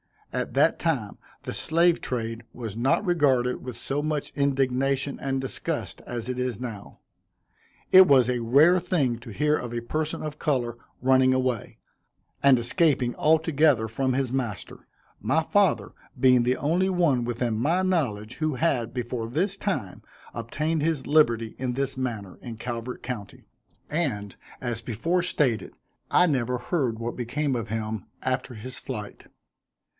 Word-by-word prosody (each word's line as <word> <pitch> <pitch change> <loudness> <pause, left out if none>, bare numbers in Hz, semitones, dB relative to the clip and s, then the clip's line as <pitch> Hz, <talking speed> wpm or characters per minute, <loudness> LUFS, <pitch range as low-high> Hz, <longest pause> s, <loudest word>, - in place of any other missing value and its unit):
At - - -2
that - - +3
time - - -1 0.2
the - - -5
slave 170 +1 +3
trade 115 -1 -3
was 115 -4 -6
not 130 - +1
regarded 135 -8 +2
with 125 -2 -7
so 145 +2 -2
much 150 -1 -2
indignation 135 0 0
and 135 0 -1
disgust, 130 - -4
as 120 -1 -4
it 125 0 -2
is 125 -4 -2
now. 115 -5 -7 0.9
It 190 0 +9
was 130 -4 +6
a 125 -1 0
rare 145 +10 +5
thing 145 -10 0
to 120 - -11
hear 150 +7 +1
of 120 -1 -6
a 120 - -2
person 155 +6 -2
of 150 -1 -5
color 120 -6 0 0.2
running 130 0 +4
away, 130 -3 -1 0.6
and 140 -2 +6
escaping 125 0 +2
altogether 155 -6 +3
from 130 +3 0
his 130 -1 0
master: 120 -6 -4 0.3
my - - +1
father - - +2 0.3
being 125 -2 +5
the 125 +1 +1
only 175 +6 +1
one 170 -9 +2
within 120 -2 -1
my 165 +9 +2
knowledge, 125 - -1
who 155 -2 -1
had, 125 -6 0
before 120 -2 -3
this 185 - 0
time, 145 - -3 0.3
obtained 150 +8 -2
his 155 -4 0
liberty 115 -7 +3
in 125 -1 -1
this 135 +1 -2
manner, 110 -8 -4
in 120 -2 -7
Calvert 120 +1 -5
county; 105 -6 -6 0.5
and, 120 - -2 0.3
as 120 -2 -3
before 145 - 0
stated, 140 -9 0 0.4
I 180 - +5
never 125 -6 0
heard 125 -3 -1
what 115 +1 -4
became 130 +3 -1
of 115 -3 -3
him 110 -1 -3 0.2
after 130 -1 -2
his 125 +4 -6
flight. 105 -6 -7
130 Hz, 150 wpm, -26 LUFS, 120-150 Hz, 0.9 s, It